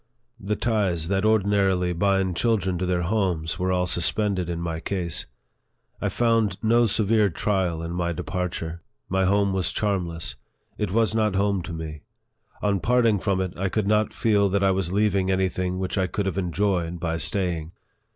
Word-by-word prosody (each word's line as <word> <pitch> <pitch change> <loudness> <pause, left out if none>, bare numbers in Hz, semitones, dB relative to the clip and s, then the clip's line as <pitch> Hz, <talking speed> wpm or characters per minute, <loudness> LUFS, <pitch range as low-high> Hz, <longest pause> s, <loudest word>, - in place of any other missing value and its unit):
The 105 0 -2
ties 95 -9 0
that 95 0 +1
ordinarily 100 -4 +2
bind 95 0 +1
children 95 -5 0
to 90 - -1
their 90 -1 0
homes 90 -3 -1
were 95 0 0
all 90 0 +1
suspended 90 +1 0
in 85 -1 -3
my 85 -1 -3
case. 85 -2 -1 0.7
I - - 0
found 115 -5 +1
no 115 +1 +4
severe 105 0 +2
trial 90 -2 -1
in 85 - -4
my 85 0 -1
departure. 85 -1 -4 0.3
My 95 0 +1
home 100 0 +2
was 95 0 0
charmless; 90 -6 -2 0.4
it 105 - -2
was 110 +3 +2
not 110 -3 +1
home 100 -1 +1
to 85 - -7
me; 80 -2 -6 0.6
on 100 -2 +2
parting 115 +1 +3
from 95 0 0
it, 95 -1 -3
I 95 +2 -1
could 110 +1 -1
not 105 +1 +2
feel 105 -3 +2
that 100 +1 +1
I 95 - +4
was 95 -2 -1
leaving 100 -2 +1
any 95 0 +2
thing 90 0 -2
which 95 +1 -2
I 95 - +1
could 100 +3 -2
have 95 - -1
enjoyed 90 -2 -1
by 80 -1 -2
staying. 85 0 -1
95 Hz, 180 wpm, -24 LUFS, 85-105 Hz, 0.7 s, no